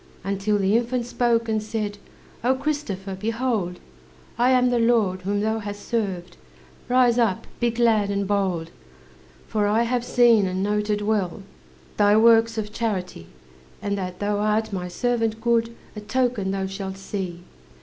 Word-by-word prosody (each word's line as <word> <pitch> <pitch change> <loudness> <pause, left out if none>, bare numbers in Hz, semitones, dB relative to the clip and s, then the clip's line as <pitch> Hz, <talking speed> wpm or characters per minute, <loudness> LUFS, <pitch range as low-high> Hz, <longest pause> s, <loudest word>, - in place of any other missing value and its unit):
Until 200 +2 0
the 195 +1 +2
infant 240 +1 0
spoke, 235 -1 +1
and 220 -1 0
said: 210 -1 -4 0.4
"O 255 +2 +3
Christopher, 260 -10 -3
behold! 215 -3 -2 0.6
I 245 +2 +3
am 250 -1 +4
the 240 - +2
Lord 225 -6 +2
whom 205 +2 -1
thou 220 +1 0
hast 205 -1 -7
served, 195 - -2 0.5
Rise 245 -1 +4
up, 220 -6 +1
be 240 - +2
glad 225 -3 +2
and 200 -1 -1
bold! 185 -5 -1 0.8
"For 210 -1 0
I 220 +3 +3
have 240 0 0
seen 235 -5 +4
and 185 +1 -2
noted 210 0 0
well, 205 -3 -1 0.5
Thy 205 0 +5
works 225 0 +5
of 210 -1 -4
charity; 185 - -3 0.5
And 200 0 -2
that 180 -2 -4
thou 205 0 -1
art 215 +1 0
my 180 -2 -3
servant 225 +3 -1
good 230 0 +1 0.2
A 210 - -6
token 230 -2 0
thou 195 0 -1
shalt 190 0 -5
see. 185 -3 -5
210 Hz, 155 wpm, -24 LUFS, 195-235 Hz, 0.8 s, Thy